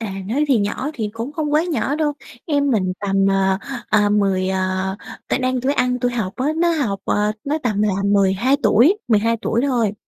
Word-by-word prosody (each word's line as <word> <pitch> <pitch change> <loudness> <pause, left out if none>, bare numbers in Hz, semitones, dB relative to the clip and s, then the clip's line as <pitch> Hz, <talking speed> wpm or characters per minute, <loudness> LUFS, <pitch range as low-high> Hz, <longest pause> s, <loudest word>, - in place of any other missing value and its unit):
À, 215 -4 -4 0.2
nói 285 +7 +1
thì 255 -5 +4
nhỏ 230 +8 -2
thì 220 -4 -3
cũng 230 +6 -5
không 300 -2 -3
quá 310 +3 +3
nhỏ 300 -4 -1
đâu. 300 -2 0 0.3
Em 285 -3 +1
mình 185 -5 +1
tầm, 195 -1 +1
à, 190 0 +1 0.3
à, 210 -1 +3
10, 195 -2 +1
à 190 0 -1 0.3
tại - - +1
đang 255 -1 0
tuổi 270 +3 +1
ăn 250 -2 0
tuổi 245 0 0
học 210 -6 -2
á, 260 - -1
nó 345 +1 +2
học, 225 -11 -1
ờ 210 +1 +1
nó 300 +3 -1
tầm 210 -4 0
là 210 -2 +2
12 200 +6 +2
tuổi, 320 - +4
12 225 +1 +2
tuổi 235 - 0
thôi. 230 -6 0
225 Hz, 210 wpm, -20 LUFS, 195-275 Hz, 0.3 s, thì